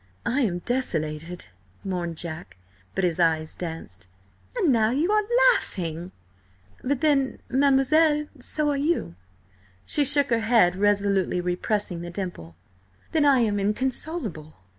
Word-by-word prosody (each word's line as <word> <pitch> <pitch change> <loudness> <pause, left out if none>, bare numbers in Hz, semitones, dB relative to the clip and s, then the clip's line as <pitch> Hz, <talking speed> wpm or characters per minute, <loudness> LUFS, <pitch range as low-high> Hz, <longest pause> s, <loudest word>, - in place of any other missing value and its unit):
"I 270 +4 +1
am 180 -7 -1
desolated," 165 -9 -3 0.4
mourned 175 -4 -4
Jack, 160 - -8 0.4
but 195 - -1
his 175 -1 0
eyes 160 -2 +1
danced. 160 - -7 0.5
"And 365 - +3
now 220 -2 +3
you 300 - 0
are 425 0 +4 0.3
laughing!" 170 - -4 0.7
"But 270 0 -1
then, 280 -4 +2
mademoiselle, 285 +3 +3
so 295 +4 -1
are 285 - -1
you!" 295 - -1 0.7
She 295 - +3
shook 285 -1 +5
her 230 - +3
head, 220 -6 +3
resolutely 200 -2 +1
repressing 180 +1 -2
the 175 - -6
dimple. 175 - -6 0.6
"Then 310 -2 +2
I 275 -3 +5
am 210 -3 +1
inconsolable." 215 - -3
205 Hz, 130 wpm, -25 LUFS, 175-275 Hz, 0.7 s, shook